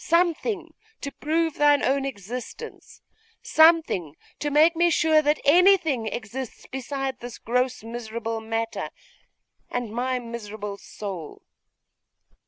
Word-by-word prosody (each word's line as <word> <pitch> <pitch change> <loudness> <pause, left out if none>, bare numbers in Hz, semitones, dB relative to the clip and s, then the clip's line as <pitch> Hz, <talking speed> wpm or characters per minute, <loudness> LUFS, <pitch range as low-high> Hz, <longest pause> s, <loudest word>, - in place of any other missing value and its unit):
something 340 +1 +1 0.3
to 280 - -5
prove 320 +2 0
thine 290 -1 +4
own 270 +1 +2
existence 250 - -7 0.4
something 315 - +4 0.2
to 295 - -1
make 310 +4 +5
me 345 +1 +4
sure 315 -1 +4
that 300 0 +2
anything 320 - +5
exists 235 +3 -6
beside 265 0 -3
this 245 -1 -8
gross 250 0 -1
miserable 225 -1 -4
matter, 225 +1 -3 0.8
and 245 -3 -3
my 255 +2 0
miserable 215 -4 -6
soul. 195 -6 -8
260 Hz, 110 wpm, -25 LUFS, 225-315 Hz, 0.8 s, make